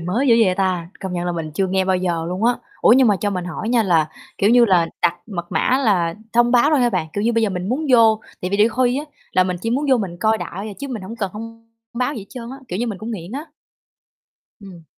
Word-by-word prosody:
mới 200 +11 -1
dữ 230 - +7
vậy 185 - +2
ta, 185 -3 -1
công 190 -2 -5
nhận 175 0 -2
là 175 - -1
mình 165 -2 -4
chưa 190 +1 +1
nghe 190 0 0
bao 190 0 +2
giờ 170 -3 -1
luôn 185 +5 -2
á. 245 - +5 0.3
Ủa, - - +6
nhưng 255 -1 +5
mà 205 - +3
cho 205 - 0
mình 180 -2 -3
hỏi 180 +5 -5
nha 235 -2 +3
là, 165 -5 +2 0.3
kiểu 200 - +3
như 240 0 +6
là, 180 -5 +3 0.2
đặt 175 0 +3
mật 175 -5 -6
mã 260 - +2
là 175 -6 +2 0.2
thông 240 +1 +4
báo 250 +5 +4
thôi 295 -4 +3
ha 240 -1 +3
bạn? 180 -5 -1
Kiểu 205 - -2
như, 235 - +2
bây 230 0 +1
giờ 215 - +2
mình 180 +1 -4
muốn 290 +6 -1
vô, 225 -3 +5 0.2
tại 180 - -2
vì 200 - +1
đôi 215 +2 +5
khi 250 +3 +1
á 295 - -4 0.3
là 185 - +4
mình 180 -1 -2
chỉ 225 - -1
muốn 280 +5 0
vô 260 - +6
mình 180 -5 -4
coi 220 0 +2
đại 200 +4 -6
à, - - -7
chứ 280 0 -5
mình 225 -6 -5
hổng 225 +5 -8
cần 195 -5 -2
thông 230 +1 -10 0.3
báo 255 +4 -1
gì 200 -4 -7
trơn 240 -2 -8
á, 270 - -7
kiểu 180 - -3
như, 240 - -1
mình 210 -5 -4
cũng 220 +2 -6
nghiện 190 -1 -6
á. 290 +4 -5 1.2
Ừm. 180 -5 -12
210 Hz, 285 wpm, -20 LUFS, 180-235 Hz, 1.2 s, dữ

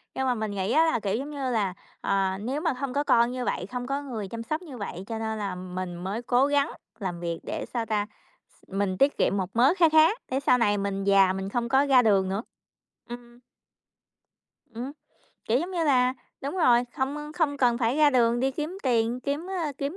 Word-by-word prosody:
Nhưng 265 - -1
mà 250 - +3
mình 215 -2 -3
nghĩ 195 +1 -2
á 320 +5 +5
là, 320 -7 +1
kiểu 205 0 -1
giống 275 +5 -4
như 275 -3 -3
là, 200 -5 0 0.3
ờ, 195 -1 0
nếu 265 +8 -3
mà 330 - +1
hông 260 0 -4
có 285 - +1
con 235 -3 +3
như 250 -1 -3
vậy, 180 - -2
không 245 +3 -5
có 275 +2 -1
người 230 -8 -5
chăm 230 +3 -6
sóc 310 +7 -3
như 295 -8 -10
vậy, 190 -4 -6
cho 225 -1 -4
nên 220 0 -3
là 200 -3 -3
mình 180 0 -5
mới 190 +6 -4
cố 245 +2 +3
gắng 285 +1 +1 0.3
làm 180 -4 -4
việc 170 -1 -3
để - - -4
sao 235 -2 -1
ta? 210 -2 0
Ph - - -30
mình 195 -1 0
tiết 280 +6 +3
kiệm 200 - +2
một 185 -1 -2
mớ 255 +7 +5
kha 335 -3 +5
khá 315 0 +7 0.2
để 265 - +1
sau 250 -2 +3
này 205 -4 +2
mình 195 0 -2
già 195 -1 +5
mình 190 0 -4
không 235 +1 -2
có 270 +3 +4
ra 265 -3 +6
đường 195 -4 +3
nữa. 200 +4 -2 0.7
Ừm. 240 0 -10 1.3
Ừm, 245 +4 -5 0.5
kiểu 235 +3 +2
giống 350 +5 -3
như 345 -3 -1
là 255 -3 +3 0.3
đúng 285 +7 -4
rồi, 245 -8 +4
không, 270 +2 -1
ơ, 300 0 -6
không 300 -4 0
cần 240 -3 +2
phải 240 +2 +1
ra 305 -1 +5
đường 240 -2 +3
đi 265 +1 +2
kiếm 310 +7 -5
tiền, 240 -1 +1
kiếm, 285 +6 -3
ơ, 335 -6 -2
kiếm 285 +5 -3
240 Hz, 230 wpm, -26 LUFS, 205-280 Hz, 1.3 s, khá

